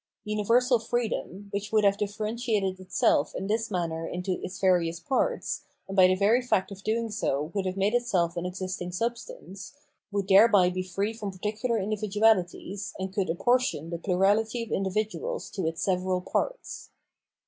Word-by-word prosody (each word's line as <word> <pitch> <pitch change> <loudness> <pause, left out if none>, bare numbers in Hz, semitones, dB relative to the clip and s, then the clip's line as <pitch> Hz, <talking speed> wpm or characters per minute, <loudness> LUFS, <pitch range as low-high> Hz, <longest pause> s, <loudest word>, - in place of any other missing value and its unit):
Universal 230 +4 +2
freedom, 220 -4 -3
which 205 +1 -4
would 215 -1 +3
have 200 -1 +4
differentiated 210 -1 -2
itself 185 -5 +1
in 190 - -3
this 220 +3 -1
manner 165 -4 -2
into 180 +1 -3
its 185 +1 -6
various 175 -3 +2
parts, 270 - -1 0.3
and 195 - -5
by 185 -2 +7
the 185 - +3
very 210 +6 +3
fact 210 -6 0
of 195 0 -9
doing 225 +2 -1
so 150 -7 -1
would 195 -2 -1
have 185 +1 -3
made 200 +3 +1
itself 190 -9 +1
an 170 - -3
existing 180 0 -4
substance, 230 - -5 0.4
would 200 -1 -1
thereby 195 -2 +6
be 185 0 -2
free 195 +4 -2
from 215 -3 -5
par 195 +2 -3
ticular 230 +1 -1
individualities, 205 -2 0
and 190 0 -4
could 195 -4 -1
apportion 210 - +1
the 170 - -3
plurality 205 +6 +1
of 230 - -9
individuals 215 - -2
to 185 -5 -2
its 165 0 -3
several 185 -1 +1
parts. - - -3
200 Hz, 165 wpm, -27 LUFS, 185-220 Hz, 0.4 s, by